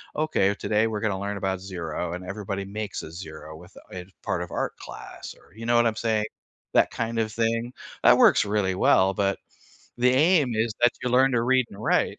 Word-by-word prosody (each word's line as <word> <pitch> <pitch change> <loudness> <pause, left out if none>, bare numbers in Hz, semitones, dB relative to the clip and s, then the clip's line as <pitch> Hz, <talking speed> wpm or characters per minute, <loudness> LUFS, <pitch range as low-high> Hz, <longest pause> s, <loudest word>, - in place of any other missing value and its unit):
"Okay, 105 -10 +1
today 110 +1 +1
we're 110 -2 -3
gonna 100 -4 -1
learn 100 +1 -3
about 95 -1 -2
0," 90 -2 -5
and 90 +1 -6
everybody 100 0 -5
makes 105 0 -5
a 80 - -9
0 80 -2 -9
with 90 +3 -16 0.2
a 90 -1 -7 0.2
part 90 - -2
of 90 - -10
art - - -3
class - - -9
or, - - -23
you 115 +1 -8
know 120 - +2
what 120 0 +5
I'm 110 - -1
saying, 110 -2 0 0.5
that - - +4
kind 115 0 -3
of 110 -1 0
thing 115 +2 -1 0.3
that - - +7
works - - +5
really 100 -2 0
well, 95 +1 +4
but 100 -1 0 0.6
the 125 +1 +3
aim 145 -2 +3
is 110 0 0
that 120 - +6
you 125 - 0
learn 130 +2 +4
to 115 -1 +2
read 130 +1 +3
and 100 +2 -11
write. - - +1
105 Hz, 210 wpm, -25 LUFS, 95-115 Hz, 0.6 s, that